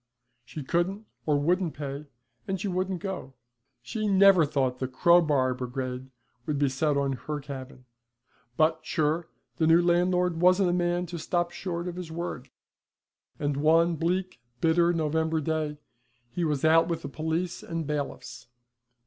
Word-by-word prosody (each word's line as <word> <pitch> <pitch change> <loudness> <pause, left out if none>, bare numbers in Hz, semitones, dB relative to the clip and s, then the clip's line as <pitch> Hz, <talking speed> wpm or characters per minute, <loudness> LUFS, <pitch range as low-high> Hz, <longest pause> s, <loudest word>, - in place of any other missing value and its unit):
She 150 +4 -8
couldn't 185 +9 -1 0.2
or 150 -2 +3
wouldn't 175 +3 0
pay, 140 0 -6 0.4
and 190 -1 -2
she 205 - -3
wouldn't 185 -1 -2
go. 185 -9 -5 0.5
She 215 - -3
never 195 -4 +6
thought 130 -4 0
the 130 - -1
crow 170 +7 +5
bar 135 -5 +2
brigade 125 +1 -5 0.4
would 150 - 0
be 140 -1 +2
set 140 +2 0
on 140 -1 0
her 150 +3 -5
cabin; 135 -2 -9 0.7
but, 160 +1 +3
sure, 155 +1 0 0.3
the 160 - +2
new 165 +1 +6
landlord 175 0 +2
wasn't 185 0 +4
a - - 0
man 175 0 0
to 170 0 -6
stop 175 +2 -1
short 175 -2 -4
of 180 0 -5
his 175 -3 -6
word, 160 -6 -5 0.9
and 145 -1 -1
one 165 +3 +4
bleak, 180 +1 -1 0.2
bitter 170 +2 +3
November 160 0 0
day 155 -1 -2 0.5
he 175 - -2
was 150 -3 0
out 165 +1 +5
with 170 -2 -3
the - - -4
police 160 +4 -3
and 165 -1 -4
bailiffs. 145 -4 -5
160 Hz, 155 wpm, -27 LUFS, 145-175 Hz, 0.9 s, never